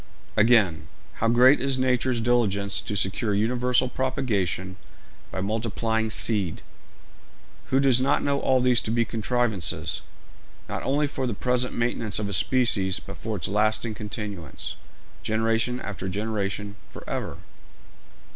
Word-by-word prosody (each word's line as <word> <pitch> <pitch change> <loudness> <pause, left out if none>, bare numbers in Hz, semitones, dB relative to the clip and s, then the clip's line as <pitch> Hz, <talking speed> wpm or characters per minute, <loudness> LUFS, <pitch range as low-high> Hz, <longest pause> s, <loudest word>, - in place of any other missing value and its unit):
Again, 105 -9 +3 0.3
how 115 - +3
great 125 +4 +5
is 135 -1 +1
nature's 130 -1 +1
diligence 105 -4 +1
to 105 - -4
secure 100 +2 +1
universal 125 +4 +1
propagation 110 - -2 0.5
by 95 - -4
multiplying 110 +1 -1
seed! 105 -6 +4 1.0
Who 135 - +1
does 130 -2 +4
not 130 - +2
know 140 0 +1
all 130 -1 +2
these 125 -1 +3
to - - -4
be 115 +1 +1
contrivances, 110 - -1 0.7
not - - -4
only 145 +2 +1
for 135 -2 -3
the 115 - -2
present 125 +2 0
maintenance 115 -2 -1
of 105 - -2
a 100 - -4
species, 100 -2 +2
but - - -10
for 110 -1 -4
its 85 - -2
lasting 110 +2 +1
continuance, 105 - -6 0.5
generation 115 +2 0
after 95 -4 -5
generation, 105 0 -3
for - - -11
ever? - - -4
110 Hz, 135 wpm, -25 LUFS, 100-125 Hz, 1.0 s, great